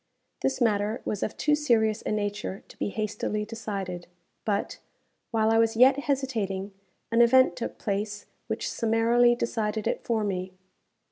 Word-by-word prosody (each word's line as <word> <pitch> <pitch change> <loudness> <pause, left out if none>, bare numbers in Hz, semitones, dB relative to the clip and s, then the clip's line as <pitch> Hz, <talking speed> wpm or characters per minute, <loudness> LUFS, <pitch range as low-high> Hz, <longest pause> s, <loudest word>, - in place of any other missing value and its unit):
This 265 -1 0
matter 215 -2 +1
was 205 - -2
of 215 - -3
too 300 - +2
serious 230 -7 +2
a - - -2
nature 205 -2 -3
to - - -15
be - - -1
hastily 210 0 -2
decided; 200 -5 -5 0.4
but, 205 -2 -1 0.5
while 220 -1 +2
I 225 - +4
was 225 0 +2
yet 260 +3 +6
hesitating, 225 -9 -2 0.4
an 230 +1 +4
event 260 +2 +5
took 235 - -5
place 205 0 -3 0.2
which - - -2
summarily 235 +1 +3
decided 220 -3 -2
it - - -1
for 225 -2 0
me. 185 -2 -3
220 Hz, 150 wpm, -27 LUFS, 205-235 Hz, 0.5 s, yet